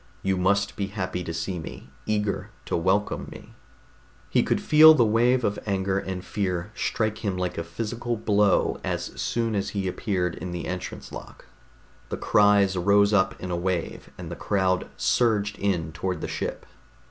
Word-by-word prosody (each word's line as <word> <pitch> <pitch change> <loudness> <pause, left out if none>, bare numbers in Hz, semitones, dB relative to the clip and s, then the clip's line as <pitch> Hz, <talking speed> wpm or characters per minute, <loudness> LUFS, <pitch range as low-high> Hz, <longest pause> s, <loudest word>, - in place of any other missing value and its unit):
You 95 0 +1
must 100 +2 +1
be 100 -2 -2
happy 95 -3 -4
to 85 - -5
see 85 +2 -3
me, 75 -4 -9 0.2
eager 105 -1 -1 0.2
to - - -2
welcome 95 +5 0
me...._ - - -11 0.8
He - - +4
could - - +1
feel 155 +1 +8
the 120 -5 +4
wave 120 +3 +3
of 100 -2 0
anger 95 -1 0
and 95 -1 -5
fear 95 -1 -2
strike 110 -2 -1
him 100 -4 -2
like 90 -1 -2
a 85 - -3
physical 115 +7 -4
blow 105 -2 +2
as - - -3
soon 115 -1 -1
as 100 -1 -1
he 95 -1 -1
appeared 90 -2 -1
in 90 -1 -6
the 85 - -4
entrance 90 0 -6
lock. - - -10 0.6
The - - -3
cries 100 -2 +4
rose 100 +3 +4
up 95 -2 +2
in 90 - -5
a - - 0
wave, 90 0 -3
and 85 -2 -7
the - - -4
crowd 95 -2 0
surged 105 -4 +1
in 90 -6 0
toward 90 +1 -3
the - - -3
ship. - - -4
100 Hz, 175 wpm, -25 LUFS, 90-105 Hz, 0.8 s, feel